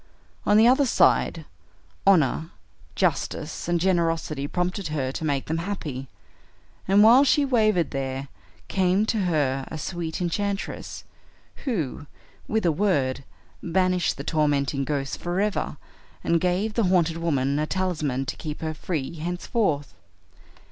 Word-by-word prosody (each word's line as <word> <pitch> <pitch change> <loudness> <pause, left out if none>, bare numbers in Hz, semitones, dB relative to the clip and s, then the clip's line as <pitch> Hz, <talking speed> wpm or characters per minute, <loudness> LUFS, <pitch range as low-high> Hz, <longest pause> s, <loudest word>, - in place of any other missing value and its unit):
On 205 - +5
the 220 - +7
other 265 +2 +4
side, - - +3 0.6
honor, 160 -3 +3 0.5
justice, - - -1
and 175 0 +1
generosity 165 -5 0
prompted 180 +3 -2
her 140 -4 -2
to 150 - -5
make 140 -3 0
them 160 +1 -2
happy, 160 -8 -4 0.8
and 200 +2 +6
while 240 +5 +8
she 285 +1 +3
wavered 215 - +2
there 135 0 -3 0.4
came 190 +2 +2
to 220 0 0
her 140 -6 +1
a 160 - -6
sweet 165 0 -4
enchantress 195 +3 -3 0.6
who, 160 - -2 0.4
with 220 -3 0
a 170 - +4
word, 145 -8 0 0.4
banished 185 0 +1
the - - -5
tormenting 145 -3 +1
ghosts 140 -2 -2
forever, 195 +4 -1 0.5
and 170 -1 +2
gave 185 +4 0
the 230 -2 +1
haunted 170 -3 +2
woman 140 -4 0
a 155 - 0
talisman 155 -9 -1
to - - -4
keep 150 -2 -6
her 160 -1 -2
free 155 -2 -3
henceforth." 170 - -1
170 Hz, 135 wpm, -25 LUFS, 145-190 Hz, 0.8 s, while